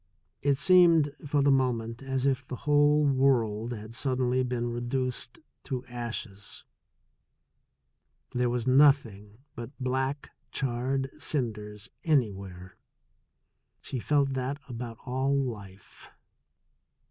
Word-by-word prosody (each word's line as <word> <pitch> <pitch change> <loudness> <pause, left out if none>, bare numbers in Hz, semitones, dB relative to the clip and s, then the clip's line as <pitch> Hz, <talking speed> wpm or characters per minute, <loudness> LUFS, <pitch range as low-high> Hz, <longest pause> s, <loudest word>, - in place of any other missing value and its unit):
It 140 0 +2
seemed 165 -2 +5
for 145 0 +2
the 140 - +4
mo 130 -2 +3
ment 115 +1 -6
as 135 -1 -2
if 135 -1 +1
the 130 - -5
whole 145 +2 +3
world 125 -5 +2
had 110 -1 -7
suddenly 130 0 0
been 125 -1 -2
reduced 120 - -3 0.3
to 130 -2 -4
ashes, 115 -4 -6 1.7
that 125 - -3
there 125 -1 +2
was 120 -1 -2
nothing 130 -7 +3 0.2
but 120 0 -7
black 130 +2 -2 0.2
charred 130 +1 -2
cinders 105 -7 -3 0.2
anywhere 100 - -1 0.5
— - - -51
she 130 - -4
felt 140 +1 +1
that 130 +2 -2
about 120 -2 -6
all 135 +2 0
life. 105 -7 -7
125 Hz, 115 wpm, -28 LUFS, 115-135 Hz, 1.7 s, seemed